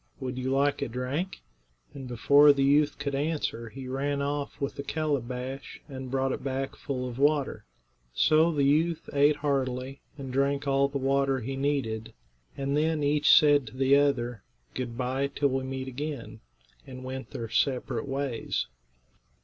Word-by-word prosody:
Would 130 Hz, 0 st, -4 dB
you 130 Hz, +1 st, -2 dB
like 140 Hz, +2 st, +1 dB
a -, -, 0 dB
drink?" 130 Hz, +10 st, -3 dB, 0.5 s
And 135 Hz, -2 st, -8 dB
before 140 Hz, +5 st, +6 dB
the 140 Hz, -1 st, +1 dB
youth 145 Hz, +1 st, +3 dB
could 145 Hz, -1 st, -3 dB
answer 140 Hz, -5 st, -2 dB
he 130 Hz, +2 st, -8 dB
ran 140 Hz, +2 st, -1 dB
off 145 Hz, 0 st, -3 dB
with 140 Hz, -1 st, -3 dB
a -, -, 0 dB
calabash 135 Hz, -3 st, -3 dB
and 130 Hz, -3 st, -7 dB
brought 135 Hz, 0 st, 0 dB
it -, -, -4 dB
back 135 Hz, 0 st, -3 dB
full 130 Hz, -3 st, -4 dB
of 125 Hz, +1 st, -7 dB
water. 145 Hz, -1 st, +1 dB, 0.5 s
So 155 Hz, -, +4 dB
the 145 Hz, -3 st, +1 dB
youth 155 Hz, +4 st, +2 dB
ate 145 Hz, +1 st, +4 dB
heartily, 135 Hz, -2 st, -2 dB, 0.2 s
and 135 Hz, -2 st, -6 dB
drank 140 Hz, +1 st, +1 dB
all 140 Hz, 0 st, +3 dB
the 140 Hz, 0 st, -3 dB
water 135 Hz, 0 st, +1 dB
he 135 Hz, +4 st, -4 dB
needed, 135 Hz, -6 st, -2 dB, 0.4 s
and 140 Hz, 0 st, -1 dB
then 155 Hz, 0 st, +1 dB
each 145 Hz, +1 st, +4 dB
said 145 Hz, -4 st, +6 dB
to 125 Hz, -, -10 dB
the 135 Hz, +1 st, +4 dB
other, 125 Hz, -6 st, +1 dB, 0.3 s
"Good 120 Hz, -2 st, -4 dB
bye, 130 Hz, +2 st, 0 dB
till 140 Hz, 0 st, 0 dB
we 130 Hz, 0 st, -1 dB
meet 130 Hz, 0 st, -4 dB
again," 140 Hz, 0 st, -5 dB, 0.5 s
and 130 Hz, -1 st, -9 dB
went 130 Hz, +1 st, -6 dB
their 115 Hz, -, -5 dB
separate 130 Hz, +3 st, 0 dB
ways. 135 Hz, -3 st, -2 dB
135 Hz, 165 wpm, -28 LUFS, 130-145 Hz, 0.5 s, before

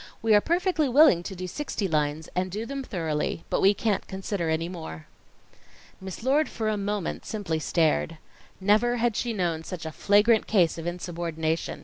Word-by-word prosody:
We 225 Hz, -1 st, +4 dB
are 205 Hz, -, +6 dB
perfectly 340 Hz, -, +1 dB
willing 270 Hz, -, +6 dB
to 190 Hz, +2 st, -7 dB
do 185 Hz, 0 st, -5 dB
sixty 205 Hz, -, -3 dB
lines, 155 Hz, -1 st, -1 dB
and 185 Hz, +1 st, 0 dB
do 210 Hz, +5 st, -4 dB
them 275 Hz, +2 st, -5 dB
thoroughly, 165 Hz, -7 st, -2 dB
but -, -, +1 dB
we 200 Hz, +2 st, +5 dB
can't 210 Hz, 0 st, -1 dB
consider 190 Hz, -3 st, -3 dB
any 160 Hz, +1 st, 0 dB
more." 160 Hz, -, -8 dB, 1.0 s
Miss 190 Hz, +3 st, -7 dB
Lord 285 Hz, +4 st, +2 dB
for 220 Hz, -2 st, -2 dB
a 215 Hz, -, 0 dB
moment 205 Hz, -2 st, -3 dB
simply 185 Hz, -7 st, -3 dB
stared. 160 Hz, 0 st, +1 dB, 0.4 s
Never 215 Hz, +5 st, +3 dB
had 235 Hz, -2 st, +1 dB
she 240 Hz, -, -1 dB
known 175 Hz, -6 st, -1 dB
such 170 Hz, -1 st, -7 dB
a 160 Hz, -, -4 dB
flagrant 210 Hz, +6 st, +3 dB
case 175 Hz, -6 st, +2 dB
of 165 Hz, -, -5 dB
insubordination. 170 Hz, -2 st, -3 dB
190 Hz, 175 wpm, -26 LUFS, 165-220 Hz, 1.0 s, are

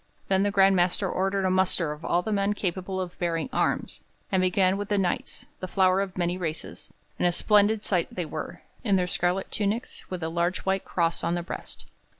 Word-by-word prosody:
Then 190 Hz, 0 st, +3 dB
the 205 Hz, -, +2 dB
Grand 195 Hz, -1 st, +5 dB
Master 180 Hz, +2 st, +2 dB
ordered 195 Hz, +1 st, 0 dB
a 185 Hz, -, +2 dB
muster 185 Hz, -4 st, +2 dB
of 150 Hz, +2 st, -8 dB
all 175 Hz, +1 st, +1 dB
the 220 Hz, -, -3 dB
men 200 Hz, 0 st, +1 dB
capable 190 Hz, -1 st, -3 dB
of 180 Hz, -1 st, -5 dB
bearing 170 Hz, +5 st, -1 dB
arms, -, -, -1 dB, 0.3 s
and 190 Hz, -1 st, +3 dB
began 185 Hz, +1 st, +3 dB
with 205 Hz, +1 st, -4 dB
the 205 Hz, -, +2 dB
Knights, 185 Hz, -3 st, -2 dB
the 185 Hz, -, -4 dB
flower 185 Hz, 0 st, +3 dB
of 190 Hz, -2 st, -4 dB
many 175 Hz, 0 st, 0 dB
races; 160 Hz, -3 st, -5 dB, 0.3 s
and -, -, +3 dB
a -, -, +3 dB
splendid 210 Hz, +3 st, +3 dB
sight 180 Hz, -4 st, +1 dB
they 180 Hz, -, -3 dB
were, 155 Hz, 0 st, -6 dB, 0.2 s
in 205 Hz, -4 st, +3 dB
their 180 Hz, -1 st, +2 dB
scarlet 180 Hz, +2 st, 0 dB
tunics 215 Hz, +3 st, -2 dB
with 180 Hz, -3 st, -4 dB
a -, -, 0 dB
large 170 Hz, +2 st, 0 dB
white 195 Hz, 0 st, 0 dB
cross 170 Hz, -1 st, 0 dB
on 170 Hz, -, +1 dB
the 175 Hz, -, -2 dB
breast. 175 Hz, -, -6 dB
185 Hz, 210 wpm, -27 LUFS, 175-195 Hz, 0.3 s, Grand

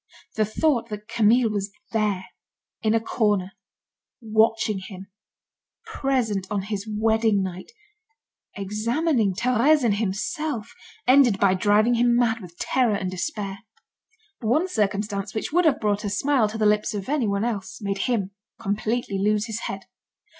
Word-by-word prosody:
The 215 Hz, -, +1 dB
thought 235 Hz, +1 st, 0 dB
that 210 Hz, 0 st, -7 dB
Camille 230 Hz, 0 st, +3 dB
was 200 Hz, -1 st, -2 dB, 0.2 s
there, 210 Hz, -4 st, 0 dB, 0.6 s
in 220 Hz, 0 st, +2 dB
a -, -, +4 dB
corner, 210 Hz, -4 st, 0 dB, 0.7 s
watching 220 Hz, -2 st, +1 dB
him, 190 Hz, 0 st, -10 dB, 0.7 s
present 255 Hz, -, -1 dB
on 200 Hz, -2 st, -1 dB
his 205 Hz, +1 st, -4 dB
wedding 220 Hz, -1 st, +2 dB
night, 185 Hz, -, -6 dB, 0.8 s
examining 215 Hz, -, 0 dB
Thérèse 255 Hz, +6 st, +3 dB
and 210 Hz, -4 st, +2 dB
himself, 230 Hz, -, -3 dB, 0.3 s
ended 250 Hz, -6 st, +5 dB
by 195 Hz, -2 st, +4 dB
driving 210 Hz, +5 st, +3 dB
him 240 Hz, 0 st, +3 dB
mad 235 Hz, -2 st, +2 dB
with 175 Hz, -2 st, -12 dB
terror 245 Hz, -5 st, +1 dB
and 185 Hz, -2 st, -3 dB
despair. 195 Hz, -, -4 dB, 0.8 s
One 250 Hz, +11 st, +1 dB
circumstance, 205 Hz, -, -2 dB
which 220 Hz, -, -3 dB
would 355 Hz, +1 st, +3 dB
have 305 Hz, -4 st, +3 dB
brought 205 Hz, -1 st, 0 dB
a 205 Hz, -, -2 dB
smile 260 Hz, 0 st, +2 dB
to 220 Hz, -, -5 dB
the 215 Hz, -, +1 dB
lips 210 Hz, 0 st, +2 dB
of 200 Hz, -2 st, -5 dB
anyone 225 Hz, -8 st, 0 dB
else, 200 Hz, -5 st, -4 dB
made 200 Hz, -2 st, -3 dB
him 200 Hz, -6 st, 0 dB, 0.3 s
completely 210 Hz, 0 st, -2 dB
lose 210 Hz, +1 st, +1 dB
his 225 Hz, -1 st, -4 dB
head. 195 Hz, 0 st, -6 dB
215 Hz, 145 wpm, -24 LUFS, 200-235 Hz, 0.8 s, ended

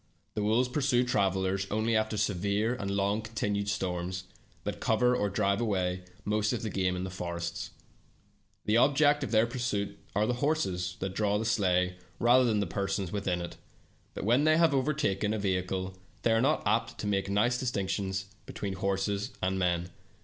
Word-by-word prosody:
The 105 Hz, -, -2 dB
wolves 110 Hz, +5 st, +2 dB
pursue 125 Hz, -2 st, +2 dB
travelers 95 Hz, -4 st, +1 dB
only 110 Hz, +2 st, +1 dB
after 110 Hz, 0 st, +1 dB
severe 100 Hz, +3 st, +1 dB
and 100 Hz, -6 st, -4 dB
long 100 Hz, +2 st, +1 dB
continued 105 Hz, -2 st, -2 dB
storms, 90 Hz, -2 st, -2 dB, 0.4 s
that -, -, -4 dB
cover 125 Hz, +3 st, +3 dB
or 105 Hz, -4 st, 0 dB
drive 100 Hz, +1 st, +1 dB
away 90 Hz, -4 st, -1 dB, 0.2 s
most 105 Hz, +2 st, +1 dB
of 120 Hz, -, -3 dB
the 110 Hz, -, -2 dB
game 90 Hz, -1 st, 0 dB
in 90 Hz, -, -3 dB
the 95 Hz, -, -4 dB
forests. 85 Hz, -2 st, -4 dB, 1.0 s
The 105 Hz, +2 st, +3 dB
objects 145 Hz, +2 st, +4 dB
of 135 Hz, -, -3 dB
their 110 Hz, 0 st, +4 dB
pursuit 110 Hz, -5 st, -2 dB, 0.2 s
are 105 Hz, +1 st, +3 dB
the 125 Hz, -, +1 dB
horses 95 Hz, -, 0 dB
that 95 Hz, 0 st, -2 dB
draw 105 Hz, 0 st, +1 dB
the 110 Hz, -, -2 dB
sleigh, 90 Hz, -5 st, +2 dB, 0.2 s
rather 125 Hz, +2 st, +5 dB
than 110 Hz, -3 st, +2 dB
the -, -, 0 dB
persons 95 Hz, +1 st, -2 dB
within 95 Hz, -4 st, -1 dB
it, 85 Hz, -, -7 dB, 0.6 s
but -, -, -4 dB
when 120 Hz, +6 st, +4 dB
they 155 Hz, 0 st, +5 dB
have 165 Hz, -2 st, +4 dB
once 135 Hz, -, +3 dB
overtaken 110 Hz, -8 st, 0 dB
a -, -, -1 dB
vehicle, 95 Hz, -1 st, -1 dB, 0.3 s
they 115 Hz, -, +3 dB
are 115 Hz, 0 st, +4 dB
not 145 Hz, +5 st, +2 dB
apt 115 Hz, 0 st, +1 dB
to -, -, -5 dB
make 100 Hz, -1 st, 0 dB
nice 115 Hz, +5 st, +2 dB
distinctions 95 Hz, -5 st, -1 dB, 0.2 s
between 100 Hz, -2 st, -4 dB
horses 100 Hz, +1 st, -1 dB
and 95 Hz, 0 st, 0 dB
men. 90 Hz, -1 st, 0 dB
100 Hz, 180 wpm, -30 LUFS, 95-115 Hz, 1.0 s, rather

